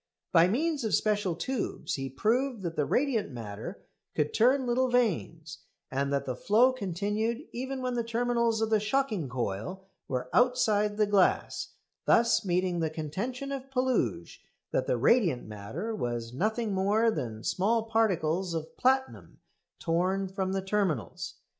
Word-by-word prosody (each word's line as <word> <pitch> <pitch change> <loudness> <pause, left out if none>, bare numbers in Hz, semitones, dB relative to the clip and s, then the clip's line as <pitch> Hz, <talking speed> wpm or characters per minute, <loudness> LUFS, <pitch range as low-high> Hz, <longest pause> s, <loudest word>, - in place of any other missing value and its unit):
By 170 0 +6
means 290 - 0
of 220 - +2
special 205 -5 +1
tubes 255 +7 -3
he 135 -1 -3
proved 230 - 0
that 170 -2 -3
the 150 - 0
"radiant 245 - +1
matter" 110 -5 -7 0.3
could 150 0 0
turn 255 +4 +4
little 250 +1 +1
vanes, 170 -9 0 0.3
and 140 +1 -1
that 140 -1 0
the 130 - -3
flow 230 - +4
continued 215 - -2
even 260 +2 -4
when 250 -1 -1
the 240 -1 0
terminals 235 -1 +1
of 220 0 0
the 215 - +4
shocking 215 - 0
coil 125 - -4 0.2
were 125 -1 -2
outside 215 -4 +3
the 215 - +4
glass, 200 -2 +1 0.3
thus 230 0 +4
meeting 180 -1 0
the 160 -1 0
contention 200 - -4
of 270 -1 -5
Puluj 260 -1 -1 0.3
that - - 0
the - - +1
radiant 180 - +3
matter 110 - -5
was 120 - -3
nothing 215 - -1
more 205 +4 +3
than 115 - -4
small 220 +5 +1
particles 185 -6 +1
of 160 -1 -5
platinum 265 +1 0 0.4
torn 185 +3 0
from 190 0 -2
the 195 -1 -1
terminals. 190 - -1
205 Hz, 150 wpm, -29 LUFS, 165-240 Hz, 0.4 s, By